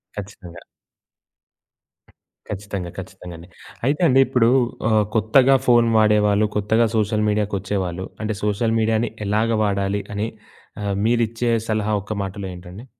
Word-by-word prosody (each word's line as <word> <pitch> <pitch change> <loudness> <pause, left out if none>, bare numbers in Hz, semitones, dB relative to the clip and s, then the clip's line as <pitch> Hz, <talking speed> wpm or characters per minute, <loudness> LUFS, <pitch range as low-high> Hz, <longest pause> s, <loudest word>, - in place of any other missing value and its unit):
ఖచ్చితంగా. 95 -4 -9 1.9
ఖచ్చితంగా. 100 -3 -5
ఖచ్చితంగా 90 -1 -9
అండి. 85 +2 -13 0.4
అయితే 145 +5 0
అండి 135 -2 +4
ఇప్పుడూ 125 -3 +3 0.4
ఆహ్, 110 -1 +3
కొత్తగా 125 +5 +4
ఫోను 120 -2 +4
వాడేవాళ్ళు 105 -1 +3
కొత్తగా 110 +3 +2
సోషల్ 105 0 +1
మీడియా‌కొచ్చేవాళ్ళు 100 -3 -2 0.2
అంటే, 110 0 -2
సోషల్ 105 +2 0
మీడియా‌ని 110 +1 +1 0.2
ఎలాగ 110 +3 +1
వాడాలి, 100 0 0
అని 105 +2 -2 0.5
ఆహ్, 100 -1 -2
మీరిచ్చే 115 0 +1 0.2
సలహా 110 -1 0
ఒక్క 105 +2 -5
మాటలో 95 0 -6
ఏంటండి? 90 +5 -11
105 Hz, 120 wpm, -21 LUFS, 100-115 Hz, 1.9 s, అండి